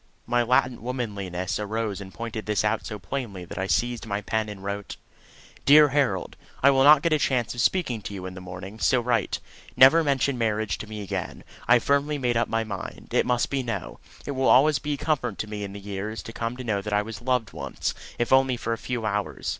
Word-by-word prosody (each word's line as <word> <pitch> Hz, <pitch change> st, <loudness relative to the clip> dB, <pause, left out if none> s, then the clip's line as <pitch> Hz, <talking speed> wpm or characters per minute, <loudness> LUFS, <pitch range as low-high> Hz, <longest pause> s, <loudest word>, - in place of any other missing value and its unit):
My 120 Hz, +1 st, +2 dB
latent 125 Hz, 0 st, +2 dB
womanliness 100 Hz, -7 st, -3 dB
arose 105 Hz, -1 st, -2 dB
and 95 Hz, -1 st, -9 dB
pointed 110 Hz, +1 st, -6 dB
this 105 Hz, -1 st, +1 dB
out 105 Hz, +1 st, 0 dB
so 105 Hz, -, -5 dB
plainly 100 Hz, -3 st, -5 dB
that 85 Hz, -, -7 dB
I 95 Hz, -, -1 dB
seized 115 Hz, +6 st, 0 dB
my 100 Hz, -1 st, -2 dB
pen 110 Hz, +1 st, -1 dB
and 100 Hz, -2 st, -8 dB
wrote: 100 Hz, 0 st, -5 dB, 0.7 s
DEAR 150 Hz, +1 st, +7 dB
HAROLD, 130 Hz, -10 st, 0 dB, 0.3 s
I 140 Hz, -, +8 dB
will 135 Hz, -1 st, +4 dB
not 145 Hz, 0 st, +7 dB
get 170 Hz, -, +2 dB
a 155 Hz, -, +3 dB
chance 125 Hz, -5 st, 0 dB
of 120 Hz, -, -2 dB
speaking 130 Hz, -, +1 dB
to 100 Hz, -, -7 dB
you 95 Hz, -1 st, -6 dB
in 95 Hz, -, -6 dB
the 95 Hz, -, -9 dB
morning, 95 Hz, +4 st, -8 dB
so 130 Hz, -, +3 dB
write. 120 Hz, -3 st, 0 dB, 0.4 s
Never 145 Hz, +6 st, +8 dB
mention 140 Hz, -2 st, +1 dB
marriage 110 Hz, -2 st, 0 dB
to 110 Hz, -, -7 dB
me 105 Hz, -1 st, -6 dB
again. 95 Hz, -, -5 dB, 0.2 s
I 120 Hz, -, +6 dB
have 120 Hz, -, +4 dB
firmly 140 Hz, +1 st, +1 dB
made 125 Hz, -3 st, 0 dB
up 115 Hz, -, +1 dB
my 115 Hz, 0 st, 0 dB
mind 100 Hz, -3 st, -7 dB
it -, -, +2 dB
must 125 Hz, -1 st, +1 dB
be 140 Hz, -1 st, 0 dB
No. 115 Hz, -, -5 dB, 0.3 s
It -, -, -3 dB
will 130 Hz, -1 st, 0 dB
always 140 Hz, +1 st, +5 dB
be 145 Hz, +4 st, -2 dB
a -, -, -3 dB
comfort 140 Hz, -9 st, -1 dB
to 110 Hz, -, -3 dB
me 105 Hz, -1 st, -5 dB
in 100 Hz, -, -5 dB
the 100 Hz, -, -8 dB
years 100 Hz, +2 st, -5 dB
to 115 Hz, -, -9 dB
come 115 Hz, +2 st, -3 dB
to 130 Hz, -, -6 dB
know 105 Hz, -4 st, -1 dB
that 105 Hz, +1 st, -4 dB
I 105 Hz, 0 st, +3 dB
was 110 Hz, 0 st, -8 dB
loved 125 Hz, -4 st, 0 dB
once, -, -, -3 dB, 0.2 s
if 120 Hz, +2 st, +1 dB
only 130 Hz, -1 st, +4 dB
for 115 Hz, -, -2 dB
a 115 Hz, -, -5 dB
few 120 Hz, -3 st, -3 dB
hours. 105 Hz, -1 st, -2 dB
115 Hz, 235 wpm, -25 LUFS, 100-130 Hz, 0.7 s, I